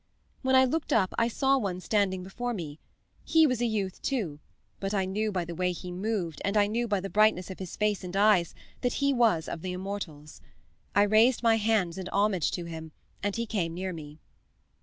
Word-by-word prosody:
"When 260 0 +2
I 260 0 +7
looked 310 +5 -2
up 190 -4 +2
I 230 - +3
saw 270 +3 +2
one 190 -6 -2
standing 190 -2 0
before 240 +6 -4
me. 155 -5 -6 0.4
He 320 -1 +5
was 255 -5 0
a 240 - +2
youth, 200 -4 -2
too, 195 - -2 0.4
but 195 +1 -2
I 190 -1 +1
knew 210 +3 -1
by 180 -3 -1
the 170 - -6
way 180 +2 0
he 180 +1 -7
moved, 180 -4 -3
and 200 +2 0
I 205 - +5
knew 235 +3 -1
by 205 -2 +1
the 195 - -5
brightness 205 -2 +3
of 185 - -9
his 185 -3 -6
face 210 -2 0
and 180 +1 -6
eyes, 200 -5 +4 0.3
that 245 -1 0
he 280 0 +1
was 225 -10 +2
of 165 - -5
the 185 +1 -4
immortals. 180 -6 -6 0.5
I 205 - +6
raised 220 +5 +4
my 225 -1 +5
hands 205 -5 +1
in 185 - -5
homage 200 -4 +1
to 175 - -3
him, 160 -1 -8 0.3
and 205 0 -1
he 235 - -1
came 175 -7 -2
near 185 +1 -3
me. 150 -2 -9
200 Hz, 215 wpm, -28 LUFS, 180-225 Hz, 0.5 s, I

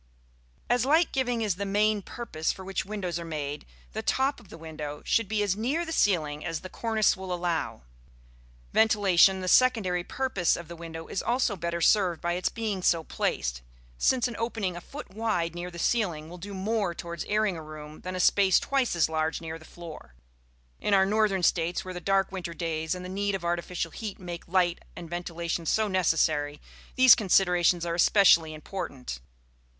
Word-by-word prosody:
As 245 -1 +2
light 315 +6 +3
giving 245 -3 0
is 200 -5 0
the 200 - -2
main 205 +1 +2
purpose 170 -7 -3
for 190 - -9
which 195 0 -3
windows 190 -5 -3
are - - -5
made, 150 -3 -5 0.2
the - - -4
top 270 +2 +1
of 195 - -18
the - - -10
window 155 -2 -7
should 230 -3 +2
be 210 0 0
as 195 -2 +1
near 270 +11 -1
the 325 - -6
ceiling 155 - +1
as 165 -2 -3
the 185 - -9
cornice 220 -2 +1
will 190 0 -7
allow. 175 - -2 0.9
Ventilation, 195 -4 +4
the 185 - -4
secondary 195 -7 +3
purpose 200 -7 0
of 170 - -8
the 170 - -8
window, 165 -1 -8
is - - -3
also 240 -3 +1
better 170 -1 -3
served 185 -3 +3
by 175 0 -1
its 180 +1 0
being 215 -5 -3
so 170 -2 +2
placed, - - -2 0.4
since 255 -2 +3
an 240 - -6
opening 225 -6 -2
a 175 - -7
foot 290 -1 -10
wide 195 -6 -1
near 175 +1 -5
the 170 - -10
ceiling 170 -6 0
will 180 - -9
do 200 +3 -7
more 200 -2 -1
towards 170 0 -5
airing 210 -2 +1
a 160 - -6
room 155 0 -10
than 185 0 -5
a - - -3
space 190 0 +4
twice 270 -7 0
as 170 - +3
large 160 0 -1
near 165 0 -6
the 160 - -15
floor. 165 - -11 0.6
In 205 - +2
our 190 0 +5
northern 205 -2 +1
States, 170 +1 +1
where 185 - -6
the 180 - -6
dark 195 +1 +1
winter 175 -3 -5
days 160 0 -2
and 180 0 -7
the - - -5
need 200 +2 -1
of 180 -3 -5
artificial 170 -1 -2
heat 215 +1 -6
make 175 -2 -8
light 175 -1 +2 0.2
and 175 - -8
ventilation 170 -1 -4
so 220 +5 +2
necessary, 155 -6 +1 0.4
these 260 -1 +9
considerations 180 -4 +3
are 170 - -1
especially 170 -3 +5
important. 140 - -6
180 Hz, 190 wpm, -27 LUFS, 165-210 Hz, 0.9 s, these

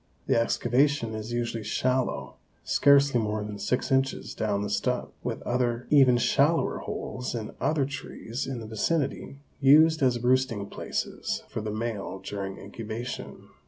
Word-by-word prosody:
The - - +2
excavation 120 +1 +2
is 110 +1 -5
usually 120 -2 -2
shallow, 125 +4 -1 0.3
scarcely 140 -2 +4
more 105 -1 -2
than 105 -1 -6
six 125 - -1
inches 135 0 0
down 105 -2 -1
the 105 - -3
stub, 125 +5 -1
with - - -4
other 120 -1 0
even 135 -4 +6
shallower 140 +7 +2
holes 125 -1 -5
in 110 -2 -5
other 150 -3 +2
trees 130 -2 -5
in 130 -3 -4
the - - -7
vicinity 135 +5 -1 0.2
used 155 +3 +6
as 125 -2 +3
roosting 125 -4 +2
places - - -3
for - - -4
the 110 - -4
male 105 -3 -3
during 95 0 -5
incubation. 110 +4 -7
120 Hz, 145 wpm, -27 LUFS, 110-135 Hz, 0.3 s, even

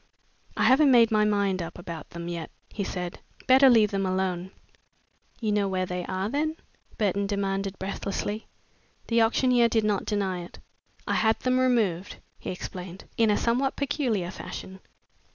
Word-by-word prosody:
"I - - +2
haven't 275 +3 +6
made 235 -3 +6
up - - -23
my 215 -1 +3
mind 200 -3 +1
about 170 -1 -7
them 170 0 -7
yet," 170 -2 -5 0.2
he 205 - -4
said. 180 -2 -5 0.3
"Better 265 +1 +7
leave 220 -4 +5
them 195 -1 0
alone." 185 -1 -1 0.9
"You 220 -3 -1
do 210 - +2
know 200 -1 +1
where 185 -1 -1
they 180 0 -4
are, 185 +1 -2
then?" 300 +6 -1 0.4
Burton 200 -1 0
demanded 195 -1 -2
breathlessly. 200 +2 -4 0.6
The 230 0 +4
auctioneer 240 +1 +3
did 225 -1 +2
not 210 -2 0
deny 195 -3 -1
it. 175 - -12 0.5
"I - - -1
had 220 0 +2
them 255 0 +2
removed," 215 -8 +1 0.2
he - - -6
explained 180 0 -7
"in 225 -1 +3
a 210 - +3
somewhat 255 +4 +1
peculiar 240 - -1
fashion. 190 0 -8
200 Hz, 165 wpm, -27 LUFS, 185-230 Hz, 0.9 s, Better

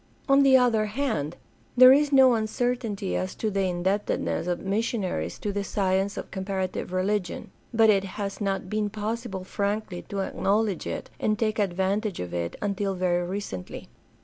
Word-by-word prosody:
On 275 +1 +5
the 270 -1 +7
other 230 -4 +2
hand, 210 - -2 0.4
there 255 +1 +10
is 290 +1 +3
no 265 -2 +7
uncertainty 225 -2 -1
as 185 0 -2
to 220 - -2
the 200 - -1
indebt 190 +4 0
edness 165 - -2
of 175 -1 -1
missionaries 195 - -2
to 205 - -3
the 200 0 -1
science 195 0 0
of - - -6
comparative 190 -2 -3
religion, 185 0 -2 0.2
but 225 -2 +5
it 195 -2 +2
has 200 0 -4
not 195 -2 -1
been 210 +1 -1
possible 210 -2 -4
frankly 200 -1 -2
to 200 -2 -2
acknowledge 200 0 0
it - - -5
and 215 0 +1
take 215 0 0
advantage 195 +1 0
of 90 -1 -5
it 85 -1 -3
until 200 -1 -1
very 175 -1 0
recently. 180 - -6
200 Hz, 165 wpm, -26 LUFS, 185-220 Hz, 0.4 s, there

